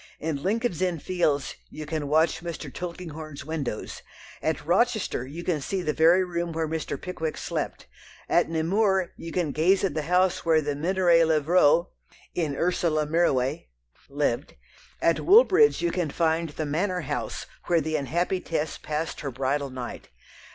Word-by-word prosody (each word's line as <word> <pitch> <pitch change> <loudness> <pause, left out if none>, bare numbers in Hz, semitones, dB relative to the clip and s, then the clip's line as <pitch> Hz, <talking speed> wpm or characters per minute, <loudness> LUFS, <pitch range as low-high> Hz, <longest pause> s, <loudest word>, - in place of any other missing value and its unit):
In 155 -3 -3
Lincoln's 210 -2 -1
Inn 180 -2 +1
Fields 155 -4 0
you 155 - -7
can 150 -1 -3
watch 160 +3 +2
Mr. 165 -5 -6
Tulkinghorn's 160 -5 -7
windows; 145 -8 -4 0.4
at - - -1
Rochester 125 - +1
you 165 +5 -7
can 165 -5 -1
see 185 +6 -2
the 150 - 0
very 170 +4 +5
room 170 -2 -3
where 160 0 -1
Mr. 155 -3 -3
Pickwick 160 -4 -4
slept; - - -4 0.4
at - - +3
Nemours 190 +3 +1
you 165 - -8
can 170 -4 0
gaze 180 +7 +3
at 195 - +1
the 155 - -1
house 180 +3 +2
where 160 -1 +4
The 145 -1 -2
Minoret 170 +1 +3
Levraults 160 +1 +4 0.4
(in 155 -5 -1
Ursule 165 -3 +1
Mirouet) 150 -2 +1 0.4
lived; - - -1 0.5
at 165 - +3
Woolbridge 440 - +5
you 170 - +2
can 175 -3 -1
find 165 +2 0
the 155 +1 -4
manor 180 +5 -1
house 145 -1 -4 0.2
where 170 -1 +4
the 155 0 -2
unhappy 170 +6 0
Tess 160 -2 -3
passed 155 +2 -3
her 140 - -3
bridal 135 +2 -1
night. 130 -2 -7
160 Hz, 160 wpm, -26 LUFS, 150-180 Hz, 0.5 s, very